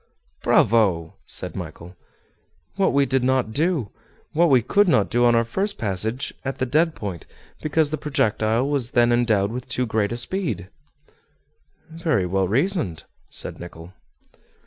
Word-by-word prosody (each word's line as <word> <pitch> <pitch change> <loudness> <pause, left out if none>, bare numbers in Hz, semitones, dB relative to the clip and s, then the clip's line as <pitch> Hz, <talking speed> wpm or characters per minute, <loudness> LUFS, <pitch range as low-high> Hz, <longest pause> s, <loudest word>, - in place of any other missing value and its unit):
"Bravo!" 95 -8 +3
said - - -4
Michel. 90 +2 -8 0.8
"What 195 0 +2
we 140 0 +3
did 130 -1 0
not 130 -3 +1
do, 150 - 0 0.4
what 170 +2 +4
we 130 -4 +5
could 205 - +3
not 110 - +3
do 120 +1 +3
on 120 -1 +5
our 115 - +4
first 195 - -2
passage 110 +4 -2
at 135 0 -3
the 130 - 0
dead 155 +5 +2
point, 95 -6 -6 0.3
because 155 -1 +1
the 155 - -2
projectile 115 -4 +1
was 140 -5 -1
then 120 0 +5
endowed 110 -4 +2
with 125 +2 -6
too 125 +1 0
great 110 -2 0
a 120 - -2
speed." 120 - -3 1.2
"Very 160 - 0
well 95 +1 0
reasoned," 130 - 0 0.3
said - - -4
Nicholl. 85 0 -10
120 Hz, 150 wpm, -23 LUFS, 105-150 Hz, 1.2 s, we